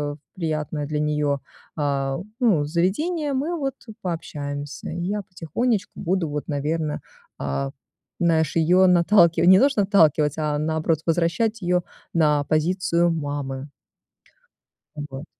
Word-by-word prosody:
в -, -, -17 dB, 0.2 s
приятное 155 Hz, -3 st, -2 dB
для 150 Hz, 0 st, -2 dB
нее, 150 Hz, -2 st, 0 dB, 0.4 s
а, 135 Hz, -2 st, 0 dB, 0.2 s
ну, 200 Hz, -, +3 dB
заведение, 280 Hz, -, 0 dB
мы 295 Hz, +6 st, -1 dB
вот 270 Hz, -2 st, -2 dB
и 220 Hz, -, -9 dB
пообщаемся. 145 Hz, -5 st, -5 dB
Я 180 Hz, +5 st, -2 dB
потихонечку 195 Hz, -, -2 dB
буду 175 Hz, -2 st, -1 dB
вот, 150 Hz, 0 st, -4 dB
наверно, 150 Hz, +1 st, -1 dB, 0.4 s
а, 70 Hz, 0 st, -2 dB, 0.5 s
знаешь, 160 Hz, -3 st, +2 dB
ее 175 Hz, +3 st, +5 dB
наталкивать 175 Hz, -1 st, +5 dB
не 190 Hz, 0 st, +8 dB
то 275 Hz, -, +6 dB
что 270 Hz, -7 st, +1 dB
наталкивать, 160 Hz, -7 st, +3 dB
а 150 Hz, -1 st, 0 dB
наоборот, 160 Hz, +1 st, 0 dB
возвращать 175 Hz, +7 st, +1 dB
ее 180 Hz, 0 st, +1 dB, 0.3 s
на 150 Hz, -3 st, +3 dB
позицию 170 Hz, +2 st, +1 dB
мамы. 145 Hz, -3 st, -4 dB, 1.3 s
Вот. 145 Hz, -1 st, -7 dB
160 Hz, 125 wpm, -23 LUFS, 150-185 Hz, 1.3 s, не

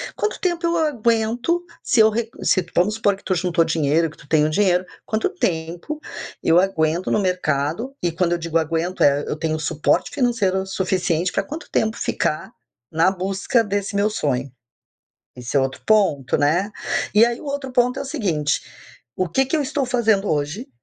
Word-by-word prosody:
Quanto 425 Hz, -, -2 dB
tempo 345 Hz, -2 st, 0 dB
eu 335 Hz, 0 st, +1 dB
aguento, 240 Hz, +2 st, +1 dB, 0.2 s
se 245 Hz, -, +2 dB
eu 220 Hz, 0 st, +7 dB
re 225 Hz, +1 st, -2 dB
se 185 Hz, -3 st, +2 dB
vamos 200 Hz, +5 st, +2 dB
supor 205 Hz, -3 st, +2 dB
que 195 Hz, -, -19 dB
tu 185 Hz, -, 0 dB
juntou 175 Hz, -1 st, +2 dB
dinheiro, 160 Hz, 0 st, +1 dB
que 155 Hz, -, -17 dB
tu -, -, -17 dB
tem 155 Hz, 0 st, +3 dB
o -, -, +1 dB
dinheiro, 180 Hz, +1 st, +2 dB, 0.2 s
quanto 220 Hz, -, 0 dB
tempo 175 Hz, -, -3 dB, 0.4 s
eu 165 Hz, +2 st, +5 dB
aguento 170 Hz, -2 st, 0 dB
no -, -, +3 dB
mercado? 180 Hz, -, -1 dB
E 175 Hz, -, 0 dB
quando 170 Hz, +1 st, 0 dB
eu 175 Hz, -, +2 dB
digo 165 Hz, 0 st, -1 dB
aguento, 165 Hz, +3 st, 0 dB
é, 145 Hz, 0 st, +4 dB
eu -, -, -2 dB
tenho 155 Hz, 0 st, -1 dB
suporte 155 Hz, 0 st, +1 dB
financeiro 210 Hz, -8 st, +1 dB
suficiente 185 Hz, -2 st, 0 dB
pra 195 Hz, -, 0 dB
quanto 305 Hz, -, -8 dB
tempo 220 Hz, +1 st, +1 dB
ficar 155 Hz, -, -2 dB, 0.4 s
na 165 Hz, +4 st, +3 dB
busca 195 Hz, +5 st, 0 dB
desse 205 Hz, 0 st, -2 dB
meu 200 Hz, +1 st, +2 dB
sonho? 140 Hz, -9 st, -2 dB, 0.9 s
Esse 125 Hz, +2 st, -4 dB
é -, -, +5 dB
outro 135 Hz, 0 st, -2 dB
ponto, 195 Hz, -12 st, +2 dB
né. 170 Hz, +8 st, +2 dB, 0.4 s
E 220 Hz, +3 st, +7 dB
aí 240 Hz, 0 st, -3 dB
o -, -, -11 dB
outro 280 Hz, -2 st, -4 dB
ponto 250 Hz, +1 st, +2 dB
é -, -, -2 dB
o -, -, -7 dB
seguinte: 165 Hz, -, -1 dB, 0.5 s
o 185 Hz, -, 0 dB
que 265 Hz, +11 st, +2 dB
que 290 Hz, -, 0 dB
eu 305 Hz, -, +1 dB
estou 275 Hz, 0 st, -1 dB
fazendo 225 Hz, -5 st, +1 dB
hoje 150 Hz, -, -2 dB
190 Hz, 185 wpm, -21 LUFS, 160-230 Hz, 0.9 s, eu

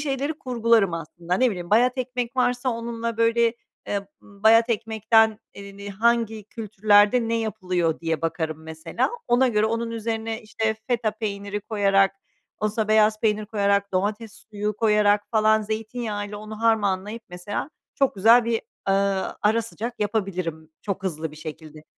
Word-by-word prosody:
şeyleri 285 Hz, +1 st, -1 dB
kurgularım, 230 Hz, -7 st, +2 dB
aslında. 170 Hz, +2 st, -4 dB
Ne 255 Hz, +4 st, +3 dB
bileyim, 175 Hz, -3 st, -6 dB
bayat 250 Hz, +4 st, +4 dB
ekmek 250 Hz, 0 st, -3 dB
varsa 250 Hz, +1 st, +1 dB
onunla 230 Hz, -1 st, -3 dB
böyle, 230 Hz, 0 st, +3 dB, 0.3 s
eee, 200 Hz, -1 st, -2 dB
bayat 220 Hz, +3 st, +3 dB
ekmekten, 220 Hz, 0 st, +2 dB, 0.2 s
eee, 200 Hz, 0 st, -10 dB
ni 200 Hz, 0 st, -7 dB
hangi 225 Hz, 0 st, +1 dB
kültürlerde 215 Hz, +1 st, +3 dB
ne 230 Hz, -, +1 dB
yapılıyor, 180 Hz, -6 st, -1 dB
diye 165 Hz, -1 st, -2 dB
bakarım, 160 Hz, -1 st, -2 dB
mesela. 160 Hz, 0 st, -2 dB, 0.2 s
Ona 250 Hz, +2 st, +4 dB
göre 215 Hz, -1 st, +2 dB
onun 230 Hz, +1 st, -2 dB
üzerine, 225 Hz, 0 st, -3 dB
işte, 220 Hz, 0 st, -1 dB
feta 235 Hz, -3 st, +1 dB
peyniri 205 Hz, -1 st, -4 dB
koyarak, 195 Hz, -2 st, +2 dB, 0.5 s
olsa 215 Hz, 0 st, -1 dB
beyaz 215 Hz, 0 st, +4 dB
peynir 215 Hz, -1 st, +1 dB
koyarak, 200 Hz, -2 st, +1 dB
domates 205 Hz, +3 st, -1 dB, 0.2 s
suyu 210 Hz, 0 st, -3 dB
koyarak 210 Hz, -2 st, +3 dB
falan 220 Hz, -1 st, +3 dB
zeytinyağıyla 215 Hz, -1 st, -4 dB
onu 215 Hz, +1 st, -9 dB
harmanlayıp, 215 Hz, -1 st, +1 dB
mesela, 185 Hz, +10 st, -5 dB, 0.2 s
çok 275 Hz, -1 st, +1 dB
güzel 225 Hz, +4 st, +6 dB
bir, 230 Hz, -1 st, -1 dB, 0.3 s
ııı, 195 Hz, 0 st, +1 dB
ara 220 Hz, +2 st, +3 dB
sıcak 230 Hz, +1 st, -6 dB
yapabilirim 185 Hz, -7 st, -2 dB
çok 200 Hz, -1 st, -3 dB
hızlı 160 Hz, -4 st, -3 dB
bir 155 Hz, -, -13 dB
şekilde. 155 Hz, -1 st, -9 dB
215 Hz, 145 wpm, -24 LUFS, 200-230 Hz, 0.5 s, güzel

